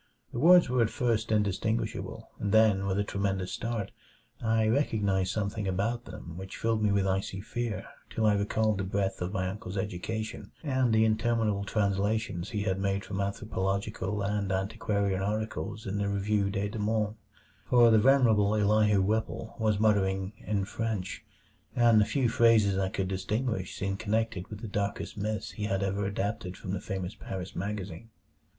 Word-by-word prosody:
The 120 Hz, -, -4 dB
words 175 Hz, +4 st, +7 dB
were 125 Hz, -1 st, +2 dB
at 115 Hz, -, +3 dB
first 115 Hz, -4 st, 0 dB
indistinguishable, 105 Hz, +1 st, -1 dB
and 100 Hz, -, -1 dB
then 105 Hz, -3 st, +4 dB
with 95 Hz, 0 st, 0 dB
a 100 Hz, -, +2 dB
tremendous 100 Hz, -2 st, -2 dB
start 115 Hz, -4 st, -3 dB, 0.5 s
I 110 Hz, -1 st, +2 dB
recognized 100 Hz, -7 st, +1 dB
something 105 Hz, 0 st, -2 dB
about 115 Hz, +6 st, -1 dB
them 85 Hz, 0 st, -9 dB
which 95 Hz, +1 st, -7 dB
filled 115 Hz, -1 st, 0 dB
me 105 Hz, -1 st, +3 dB
with 100 Hz, -1 st, +2 dB
icy 95 Hz, 0 st, -1 dB
fear 115 Hz, +2 st, -3 dB, 0.2 s
till 110 Hz, -, -1 dB
I 105 Hz, -, +5 dB
recalled 105 Hz, +1 st, +1 dB
the -, -, 0 dB
breadth 95 Hz, 0 st, -1 dB
of 90 Hz, +1 st, -2 dB
my 95 Hz, -2 st, -1 dB
uncle's 95 Hz, 0 st, -5 dB
education 110 Hz, +3 st, -4 dB
and 130 Hz, -5 st, +1 dB
the 110 Hz, 0 st, +4 dB
interminable 110 Hz, -2 st, +1 dB
translations 100 Hz, -2 st, 0 dB
he 105 Hz, -3 st, -2 dB
had 95 Hz, -2 st, 0 dB
made 100 Hz, 0 st, -1 dB
from 100 Hz, 0 st, -3 dB
anthropological 100 Hz, 0 st, -2 dB
and 100 Hz, -1 st, -1 dB
antiquarian 100 Hz, 0 st, 0 dB
articles 105 Hz, -1 st, -3 dB
in 100 Hz, 0 st, -2 dB
the 100 Hz, 0 st, 0 dB
Revue 100 Hz, 0 st, +1 dB
des 100 Hz, 0 st, -1 dB
Deux 110 Hz, +1 st, -5 dB
Mondes. 105 Hz, 0 st, 0 dB, 0.5 s
For 120 Hz, -2 st, +6 dB
the 110 Hz, -, +6 dB
venerable 110 Hz, -5 st, +4 dB
Elihu 105 Hz, -1 st, +3 dB
Whipple 110 Hz, +2 st, -2 dB
was 110 Hz, -2 st, +2 dB
muttering 95 Hz, -2 st, +2 dB
in 100 Hz, -2 st, -1 dB
French, 105 Hz, -2 st, -3 dB, 0.5 s
and 115 Hz, -3 st, +5 dB
the -, -, +4 dB
few 135 Hz, 0 st, +1 dB
phrases 115 Hz, -4 st, +4 dB
I 95 Hz, 0 st, 0 dB
could 95 Hz, -1 st, -2 dB
distinguish 95 Hz, +1 st, -2 dB
seemed 95 Hz, 0 st, -2 dB
connected 110 Hz, -3 st, -1 dB
with 105 Hz, 0 st, -8 dB
the 115 Hz, -, -5 dB
darkest 100 Hz, 0 st, -3 dB
myths 105 Hz, 0 st, -3 dB
he 105 Hz, -, -4 dB
had 100 Hz, -2 st, 0 dB
ever 100 Hz, +1 st, -1 dB
adapted 100 Hz, -1 st, -3 dB
from 95 Hz, -, -6 dB
the 95 Hz, -, -2 dB
famous 95 Hz, -1 st, -4 dB
Paris 95 Hz, -1 st, -7 dB
magazine. 100 Hz, 0 st, -5 dB
105 Hz, 170 wpm, -29 LUFS, 95-110 Hz, 0.5 s, words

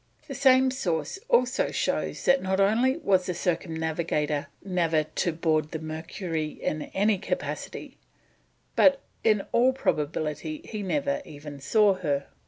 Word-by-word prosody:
The 275 Hz, -, -5 dB
same 260 Hz, -1 st, +5 dB
source 180 Hz, -, -2 dB
also 250 Hz, +2 st, +3 dB
shows -, -, -2 dB
that 270 Hz, -, +4 dB
not 190 Hz, +1 st, 0 dB
only 235 Hz, +8 st, +3 dB
was 190 Hz, -, +2 dB
the 180 Hz, -, -2 dB
Circumnavigator 160 Hz, -4 st, -1 dB, 0.2 s
never 165 Hz, -5 st, +1 dB, 0.2 s
on 170 Hz, -, 0 dB
board 155 Hz, -2 st, +1 dB
the 160 Hz, -, -4 dB
Mercury 160 Hz, +1 st, -4 dB
in 155 Hz, -, -2 dB
any 205 Hz, 0 st, +2 dB
capacity, -, -, -5 dB, 0.8 s
but 275 Hz, -1 st, +5 dB, 0.2 s
in 215 Hz, -3 st, +3 dB
all 255 Hz, +2 st, +4 dB
probability 155 Hz, -, -2 dB
he 215 Hz, -2 st, -5 dB
never 280 Hz, +8 st, -1 dB
even 145 Hz, -, -10 dB
saw 205 Hz, +8 st, +4 dB
her. 145 Hz, -7 st, -1 dB
180 Hz, 135 wpm, -27 LUFS, 155-235 Hz, 0.8 s, same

